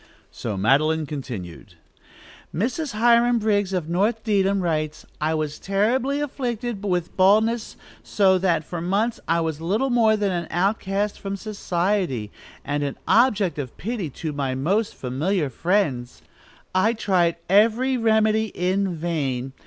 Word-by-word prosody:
So 105 Hz, -4 st, -5 dB
Madeline 155 Hz, +9 st, +2 dB
continued: 125 Hz, -, -7 dB, 0.8 s
"Mrs. 255 Hz, -, -2 dB
Hiram 235 Hz, +2 st, +4 dB
Briggs, 205 Hz, -3 st, +1 dB
of 180 Hz, -5 st, -2 dB
North 210 Hz, +6 st, 0 dB
Dedham, 200 Hz, -3 st, +1 dB
writes: 155 Hz, -3 st, -2 dB, 0.2 s
'I 155 Hz, +1 st, +1 dB
was 155 Hz, -1 st, -3 dB
terribly 240 Hz, +8 st, 0 dB
afflicted 240 Hz, -6 st, -3 dB
with 180 Hz, -4 st, -2 dB
baldness, 215 Hz, +4 st, +3 dB, 0.3 s
so 190 Hz, -2 st, +2 dB
that, 170 Hz, -4 st, +1 dB
for 170 Hz, +2 st, -6 dB
months, 205 Hz, +7 st, 0 dB
I 170 Hz, 0 st, +2 dB
was 160 Hz, -1 st, -3 dB
little 215 Hz, +11 st, 0 dB
more 225 Hz, -3 st, +4 dB
than 205 Hz, -2 st, 0 dB
an 170 Hz, -2 st, -3 dB
outcast 195 Hz, +3 st, -1 dB
from 200 Hz, 0 st, -4 dB
society, 180 Hz, -, -2 dB, 0.3 s
and 145 Hz, +1 st, -1 dB
an 140 Hz, -1 st, -3 dB
object 215 Hz, -, +3 dB
of 130 Hz, -4 st, -6 dB
pity 210 Hz, -6 st, -3 dB, 0.2 s
to 155 Hz, -, -1 dB
my 135 Hz, -2 st, -2 dB
most 195 Hz, +11 st, 0 dB
familiar 145 Hz, +5 st, -1 dB
friends. 145 Hz, -, -1 dB, 0.5 s
I 190 Hz, +5 st, +3 dB
tried 185 Hz, -6 st, +1 dB
every 225 Hz, +7 st, +3 dB
remedy 220 Hz, -2 st, +2 dB
in 185 Hz, +1 st, 0 dB
vain. 140 Hz, -6 st, -2 dB
190 Hz, 135 wpm, -23 LUFS, 155-220 Hz, 0.8 s, Hiram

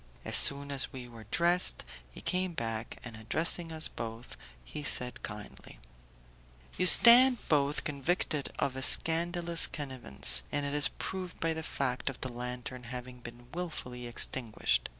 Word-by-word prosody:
As -, -, +2 dB
soon 140 Hz, 0 st, +5 dB
as 140 Hz, -2 st, +2 dB
we 125 Hz, -2 st, -10 dB
were 115 Hz, -3 st, -14 dB
dressed, 175 Hz, -, +2 dB, 0.2 s
he -, -, -13 dB
came 185 Hz, -1 st, -2 dB
back, 115 Hz, -4 st, -5 dB
and 125 Hz, -3 st, -9 dB
addressing 165 Hz, +9 st, -2 dB
us 160 Hz, 0 st, +3 dB
both, 115 Hz, 0 st, -9 dB, 0.3 s
he 150 Hz, -, -8 dB
said, 125 Hz, -4 st, -1 dB
kindly: -, -, -10 dB, 1.0 s
"You 185 Hz, -, +2 dB
stand 245 Hz, +4 st, +7 dB
both 145 Hz, -1 st, 0 dB
convicted 150 Hz, 0 st, -3 dB
of 135 Hz, -2 st, -2 dB
a 130 Hz, -, -6 dB
scandalous 170 Hz, +3 st, +2 dB
connivance, 120 Hz, -, +1 dB
and 145 Hz, -, -3 dB
it 140 Hz, -, -4 dB
is 145 Hz, -3 st, +7 dB
proved 185 Hz, +6 st, -6 dB
by 165 Hz, 0 st, -1 dB
the 160 Hz, -, -6 dB
fact 135 Hz, -4 st, -4 dB
of 130 Hz, -, -9 dB
the 130 Hz, -2 st, -6 dB
lantern 125 Hz, +1 st, -7 dB
having 125 Hz, +1 st, -9 dB
been 120 Hz, +1 st, -13 dB
wilfully 125 Hz, -8 st, -7 dB
extinguished. 115 Hz, -, -2 dB
135 Hz, 150 wpm, -30 LUFS, 120-165 Hz, 1.0 s, stand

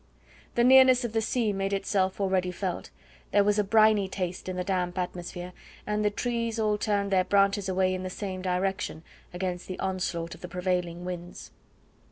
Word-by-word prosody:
The 240 Hz, -, +3 dB
nearness 260 Hz, 0 st, +7 dB
of 230 Hz, -, -4 dB
the 225 Hz, -, +1 dB
sea 220 Hz, -1 st, 0 dB
made 195 Hz, 0 st, -2 dB
itself 195 Hz, -1 st, 0 dB
already 190 Hz, -2 st, +1 dB
felt; 180 Hz, 0 st, -4 dB, 0.4 s
there 205 Hz, -, +4 dB
was 205 Hz, +1 st, +2 dB
a -, -, +3 dB
briny 215 Hz, -1 st, +4 dB
taste 185 Hz, -1 st, -4 dB
in 185 Hz, -, -3 dB
the 180 Hz, -, -2 dB
damp 180 Hz, -1 st, -1 dB
atmosphere, 180 Hz, 0 st, -5 dB, 0.3 s
and 210 Hz, 0 st, -1 dB
the 210 Hz, -, +3 dB
trees 230 Hz, +1 st, -2 dB
all 210 Hz, -1 st, +1 dB
turned 200 Hz, -2 st, 0 dB
their 185 Hz, -1 st, +4 dB
branches 200 Hz, +1 st, +2 dB
away 185 Hz, 0 st, +2 dB
in 185 Hz, -, -3 dB
the 185 Hz, -, -4 dB
same 185 Hz, -1 st, -5 dB
direction 185 Hz, -3 st, -2 dB, 0.3 s
against 180 Hz, 0 st, -4 dB
the 185 Hz, -, -5 dB
onslaught 180 Hz, -3 st, -2 dB
of -, -, -13 dB
the 180 Hz, -, -6 dB
prevailing 180 Hz, -1 st, -2 dB
winds. 175 Hz, -1 st, -7 dB
190 Hz, 185 wpm, -28 LUFS, 180-210 Hz, 0.4 s, nearness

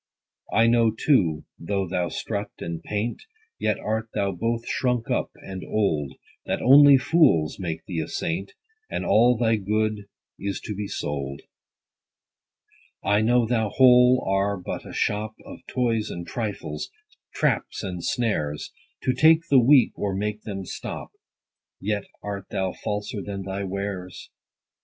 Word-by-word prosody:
I 115 Hz, +2 st, +4 dB
know 115 Hz, -1 st, +4 dB
too, 105 Hz, -, +2 dB
though 95 Hz, +2 st, -2 dB
thou 90 Hz, 0 st, -1 dB
strut 100 Hz, -2 st, -3 dB
and 85 Hz, -1 st, -5 dB
paint, 105 Hz, +6 st, -3 dB, 0.4 s
Yet -, -, +1 dB
art 110 Hz, +1 st, -2 dB
thou 100 Hz, -1 st, +1 dB
both 115 Hz, +6 st, -2 dB
shrunk 125 Hz, -3 st, 0 dB
up, -, -, 0 dB
and 95 Hz, -1 st, -8 dB
old, 80 Hz, -10 st, 0 dB, 0.3 s
That -, -, 0 dB
only 140 Hz, +2 st, +8 dB
fools 130 Hz, -, +3 dB
make 85 Hz, -3 st, -4 dB
thee 85 Hz, -3 st, -3 dB
a 80 Hz, -, -2 dB
saint, 90 Hz, +4 st, -3 dB, 0.4 s
And -, -, -3 dB
all 120 Hz, +2 st, +5 dB
thy 115 Hz, -1 st, +2 dB
good 105 Hz, +1 st, -1 dB, 0.3 s
is 100 Hz, 0 st, -3 dB
to 105 Hz, -, -5 dB
be 100 Hz, 0 st, -4 dB
sold. 70 Hz, -5 st, -4 dB, 1.6 s
I 105 Hz, +1 st, +3 dB
know 120 Hz, +2 st, +3 dB
thou 110 Hz, -2 st, 0 dB
whole 125 Hz, +1 st, +6 dB
are 100 Hz, +1 st, +1 dB
but 90 Hz, -, -6 dB
a -, -, -8 dB
shop 105 Hz, +1 st, -1 dB
Of -, -, -10 dB
toys 115 Hz, -4 st, 0 dB
and 85 Hz, 0 st, -6 dB
trifles, 105 Hz, -10 st, -4 dB, 0.5 s
traps -, -, 0 dB
and 90 Hz, -3 st, -5 dB
snares, 75 Hz, -12 st, -1 dB, 0.3 s
To 130 Hz, -, +2 dB
take 160 Hz, +5 st, +4 dB
the 135 Hz, -, +8 dB
weak, 130 Hz, +1 st, +6 dB
or 100 Hz, -2 st, -1 dB
make 105 Hz, +2 st, -2 dB
them 95 Hz, -3 st, -6 dB
stop: -, -, -6 dB, 0.7 s
Yet 100 Hz, 0 st, -2 dB, 0.2 s
art 100 Hz, -1 st, -5 dB
thou 95 Hz, -2 st, -1 dB
falser 105 Hz, -1 st, -4 dB
than 100 Hz, 0 st, -5 dB
thy 95 Hz, +1 st, -4 dB
wares. 95 Hz, -1 st, -5 dB
105 Hz, 145 wpm, -25 LUFS, 95-115 Hz, 1.6 s, only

